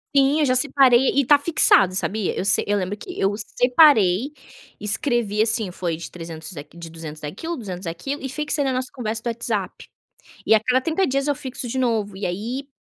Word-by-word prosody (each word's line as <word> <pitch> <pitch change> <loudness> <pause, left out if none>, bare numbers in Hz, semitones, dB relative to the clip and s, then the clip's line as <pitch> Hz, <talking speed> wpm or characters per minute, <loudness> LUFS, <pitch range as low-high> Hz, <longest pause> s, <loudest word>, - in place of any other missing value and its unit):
Sim 275 +3 +4
eu 300 - +3
já 255 -1 +2
separei 260 -2 +4
e 280 - +3
está 285 +3 +5
fixado 285 - +4
sabia. 205 +1 -1
Eu - - -2
sei 200 - +2
eu 205 0 +1
lembro 190 +3 -3
que 360 - -9
eu 195 +1 +2
separei 245 - +3 0.5
e - - -13
escrevi 215 -1 0
assim 220 -4 -1
foi 175 -2 -3
de 170 - -8
300 165 0 -9
aqui 145 +4 -10
de 165 -1 -9
200 160 -2 -9
daquilo 260 - -5
200 185 -6 -7
aquilo 270 - -5
e - - -2
fixei 300 +1 -1
na 265 -1 0
nossa 255 0 -3
conversa 225 -3 -4
do 240 - -6
WhatsApp. 235 0 -3 0.6
E 220 - +5
a 215 - +4
cada 255 0 +2
30 330 +7 0
dias 275 +2 -1
eu 290 - +2
fixo 260 -2 -6
de 260 - -3
novo, 220 -6 -1
e 195 - -5
aí 235 +10 -4
230 Hz, 210 wpm, -22 LUFS, 190-270 Hz, 0.6 s, está